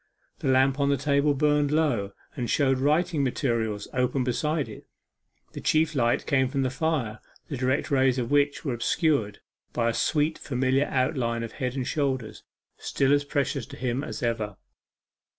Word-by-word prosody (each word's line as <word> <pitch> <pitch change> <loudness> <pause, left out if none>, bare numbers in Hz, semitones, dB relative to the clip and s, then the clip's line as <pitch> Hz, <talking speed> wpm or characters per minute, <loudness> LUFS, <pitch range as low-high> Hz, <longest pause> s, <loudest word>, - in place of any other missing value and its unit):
The - - -3
lamp 135 +1 +3
on 140 0 +2
the 140 - +2
table 140 +1 +2
burned 145 0 +2
low, 140 -11 +1 0.2
and 125 -5 -3
showed 135 -3 +2
writing 150 +2 +2
materials 115 -5 -1
open 125 +1 +1
beside 150 +4 -1
it; 105 - -11 0.6
the - - -7
chief 160 0 +2
light 120 -4 +1
came 130 -2 +2
from 135 +1 -1
the 130 - 0
fire, 130 -8 -1 0.3
the 140 - -3
direct 130 +3 0
rays 130 -2 +3
of 120 0 -2
which 145 +1 +2
were 135 - 0
obscured 120 -3 0 0.3
by 115 -1 +1
a - - -1
sweet 155 +5 +1
familiar 130 +1 +1
outline 130 -4 0
of 115 - -5
head 125 -1 -3
and 130 -2 -2
shoulders 130 -7 -2 0.4
still 135 0 +1
as 145 0 +3
precious 140 -4 -1
to - - -10
him 125 +2 -2
as - - -6
ever. 110 -4 -2
135 Hz, 170 wpm, -26 LUFS, 120-145 Hz, 0.6 s, lamp